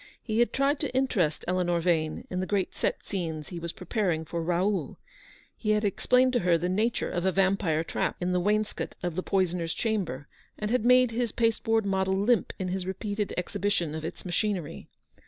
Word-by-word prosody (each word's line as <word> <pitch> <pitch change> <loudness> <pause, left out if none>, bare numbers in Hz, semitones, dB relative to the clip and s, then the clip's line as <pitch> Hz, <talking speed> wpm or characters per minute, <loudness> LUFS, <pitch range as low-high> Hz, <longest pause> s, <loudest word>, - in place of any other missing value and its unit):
He 220 -1 -2
had 240 - +3
tried 275 +2 +1
to 290 - -2
interest 190 - +1
Eleanor 175 -1 +1
Yane 160 -2 0
in 180 - -1
the 185 - -2
great 200 -3 0
set - - -1
scenes 160 -6 -4
he 175 - -5
was 170 0 -4
pre 180 - -11
paring 175 -8 0
for 170 +1 -3
Raoid. 180 +4 0 0.6
He 215 - -4
had 210 0 +1
explained 250 +6 +3
to 245 - +3
her 175 -3 +3
the 175 +2 -1
nature 215 +6 0
of 175 - -1
a 190 - +3
vampire 190 -4 +2
trap - - -1
in 180 0 -1
the 180 - +2
wainscot 210 +3 -1
of 175 -2 -1
the 185 - 0
poisoner's 180 -4 0
chamber, 180 - -2 0.3
and 210 +1 -3
had 250 -3 +2
made 250 -1 +6
his 235 0 -1
pasteboard 225 -1 +1
model 190 -1 +1
limp 210 +1 +2
in 185 -1 -3
his 185 0 -3
repeated 205 +2 -2
exhibition 180 -3 -1
of 160 0 -5
its 160 - -6
machinery. 180 -2 -2
190 Hz, 195 wpm, -28 LUFS, 175-215 Hz, 0.6 s, made